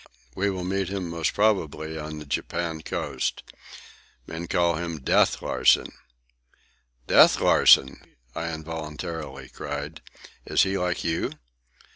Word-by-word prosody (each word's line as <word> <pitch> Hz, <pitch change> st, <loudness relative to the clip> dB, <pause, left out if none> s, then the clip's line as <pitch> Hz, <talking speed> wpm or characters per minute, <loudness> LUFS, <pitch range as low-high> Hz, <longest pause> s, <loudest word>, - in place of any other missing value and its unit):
"We 100 Hz, +2 st, 0 dB
will 95 Hz, -2 st, -3 dB
meet 95 Hz, 0 st, -1 dB
him 95 Hz, -3 st, -4 dB
most 85 Hz, -1 st, -1 dB
probably 80 Hz, -7 st, 0 dB
on 75 Hz, 0 st, -6 dB
the 75 Hz, -, -8 dB
Japan 80 Hz, +3 st, -3 dB
coast. -, -, -3 dB, 0.8 s
Men 85 Hz, +2 st, -6 dB
call 85 Hz, -2 st, +2 dB
him 85 Hz, -2 st, -4 dB
'Death' -, -, +2 dB
Larsen." -, -, +3 dB, 1.1 s
"Death -, -, +6 dB
Larsen!" 65 Hz, 0 st, +5 dB, 0.3 s
I 85 Hz, 0 st, -3 dB
involuntarily 80 Hz, -3 st, -6 dB
cried. 75 Hz, +2 st, -6 dB, 0.4 s
"Is -, -, +3 dB
he 95 Hz, 0 st, -1 dB
like 90 Hz, -2 st, -1 dB
you?" 80 Hz, 0 st, -1 dB
80 Hz, 120 wpm, -25 LUFS, 75-90 Hz, 1.1 s, Death